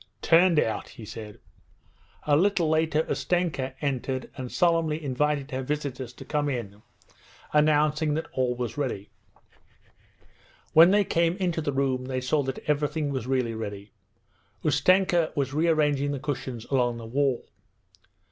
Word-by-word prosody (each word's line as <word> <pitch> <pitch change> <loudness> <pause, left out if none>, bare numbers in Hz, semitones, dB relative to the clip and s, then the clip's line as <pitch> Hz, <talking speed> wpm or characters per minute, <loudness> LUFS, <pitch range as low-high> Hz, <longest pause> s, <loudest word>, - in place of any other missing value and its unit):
'Turned 170 -1 +5
out,' 110 - -1
he 110 - -11
said. 105 -1 -9 0.8
A 145 - +3
little 180 0 +2
later 160 0 +2
Ustenka 135 -2 -1
entered 130 -1 -2
and 130 -2 -6
solemnly 165 -3 +2
invited 145 +1 -1
her 130 0 -2
visitors 135 -3 -4
to - - -11
come 145 -1 -1
in: 105 -6 -5 0.7
announcing 150 0 +3
that 160 - -2
all 125 -1 0
was 120 +2 -4
ready. 115 -8 -3 1.6
When 165 +3 +8
they 205 +1 +4
came 170 -1 +1
into 175 -4 -1
the 145 - -1
room 135 -2 0
they 130 0 -2
saw 130 +4 +1
that 135 -1 -5
everything 150 0 0
was 130 -3 -3
really 130 -3 0
ready. 105 -2 -6 0.7
Ustenka 175 +2 +3
was 140 -1 -1
rearranging 150 -3 +2
the 140 - -3
cushions 130 -5 -4
along 120 -3 +1
the 115 - -8
wall. 130 +1 0
145 Hz, 140 wpm, -26 LUFS, 130-155 Hz, 1.6 s, When